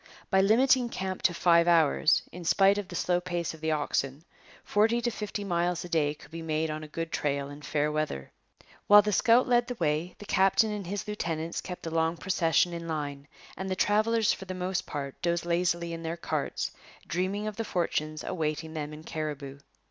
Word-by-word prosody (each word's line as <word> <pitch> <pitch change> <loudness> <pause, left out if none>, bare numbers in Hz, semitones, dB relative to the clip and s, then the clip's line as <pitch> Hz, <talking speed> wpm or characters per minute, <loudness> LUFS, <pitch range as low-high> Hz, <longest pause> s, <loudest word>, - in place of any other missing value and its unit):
By 190 -1 +5
limiting 245 +4 +4
camp 190 -3 -4
to 175 - +3
five 170 0 +4
hours, 165 -1 +4
in 180 +1 -8
spite 195 +4 +4
of 200 - -5
the - - -8
slow 180 0 +1
pace 175 -2 -3
of 160 - -13
the 160 - -1
oxen, 145 -1 -1 0.4
forty 220 +3 +2
to 240 0 -1
fifty 210 -1 -4
miles 175 -2 0
a - - -9
day 150 -3 +1
could 150 - -16
be 165 0 -6
made 160 0 -1
on 155 0 -5
a - - -8
good 165 +2 -5
trail 140 -1 -1
in 145 +1 -10
fair 150 0 0
weather. 150 - -3 0.6
While 205 0 +9
the 210 - 0
scout 235 +5 +4
led 240 -1 +3
the 245 - -4
way, 160 -1 -1
the 205 - -10
captain 195 +3 +3
and 205 -4 -5
his 205 +2 -4
lieutenants 165 -5 -3
kept 180 -1 -7
the 165 - -4
long 165 +1 +1
procession 175 -1 +2
in 170 0 -5
line; 145 -3 -4 0.3
and 190 +2 -5
the 185 - 0
travellers 215 +2 +2
for 190 - -8
the 185 0 -5
most 185 0 -2
part 140 -2 -5
dozed 170 0 0
lazily 170 0 0
in 165 - -6
their 165 +1 -4
carts, - - -2 0.3
dreaming 190 +4 -2
of 215 -2 -4
the 225 - -1
fortunes 155 -6 -2
awaiting 160 -2 -3
them 150 -1 -4
in 155 +1 -10
Cariboo. 145 -3 -5
170 Hz, 205 wpm, -28 LUFS, 155-195 Hz, 0.6 s, While